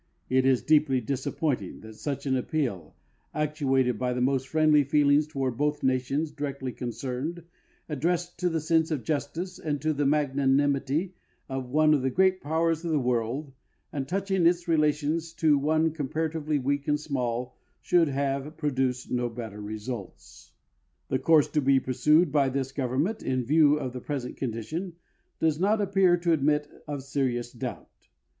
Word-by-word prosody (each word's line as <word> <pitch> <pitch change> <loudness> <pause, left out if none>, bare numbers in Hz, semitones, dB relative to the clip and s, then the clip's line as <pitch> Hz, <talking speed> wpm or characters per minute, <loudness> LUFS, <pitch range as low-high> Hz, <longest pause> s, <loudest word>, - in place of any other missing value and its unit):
It 130 0 +3
is 130 -2 +3
deeply 150 -4 +3
disappointing 130 - -2
that 110 0 -11
such 140 +6 -4
an 135 -1 +1
appeal, 125 - -2 0.4
actuated 135 -6 +1
by 125 -1 0
the 125 - -2
most 130 +1 +1
friendly 155 -1 +4
feelings 145 +1 +3
toward 135 -5 -2
both 150 +1 0
nations 135 +4 0
directly 140 -3 -4
concerned, 130 +8 -4 0.4
addressed 170 +4 -2
to 180 0 +1
the 165 -2 -1
sense 160 +1 +2
of 150 -7 -2
justice 165 - -3
and 145 -2 -2
to 155 0 +2
the 145 -1 0
magnanimity 140 +3 +1 0.3
of 130 -2 -4
one 155 +3 +4
of 145 - +2
the 130 - +1
great 185 +5 +2
powers 160 +2 0
of 170 - -3
the 155 -2 +2
world 125 +3 -1 0.4
and 135 -2 -3
touching 190 -1 +1
its 175 +1 +1
relations 155 +1 +1
to 155 -4 +3
one 155 +3 +2
comparatively 155 +1 -2
weak 140 +1 -1
and 150 0 +2
small, 125 -4 -3 0.2
should 175 -2 +3
have 140 +2 -2
produced 130 -4 -1
no 120 -1 0
better 115 -3 -7
results. 105 0 -8 0.6
The 130 - +1
course 155 +2 +4
to 150 - +1
be 135 0 +4
pursued 150 +6 +3
by 140 -2 +3
this 135 0 -2
government, 135 - -1
in 130 -2 -1
view 150 +2 +5
of 130 -4 -4
the 125 - -6
present 135 -3 -4
condition, 135 - -4 0.5
does 160 -1 +1
not 205 +4 +2
appear 195 -3 +3
to 170 0 0
admit 150 0 +1 0.2
of 145 -2 -4
serious 125 -3 -1
doubt. 120 - -8
145 Hz, 160 wpm, -27 LUFS, 130-155 Hz, 0.6 s, view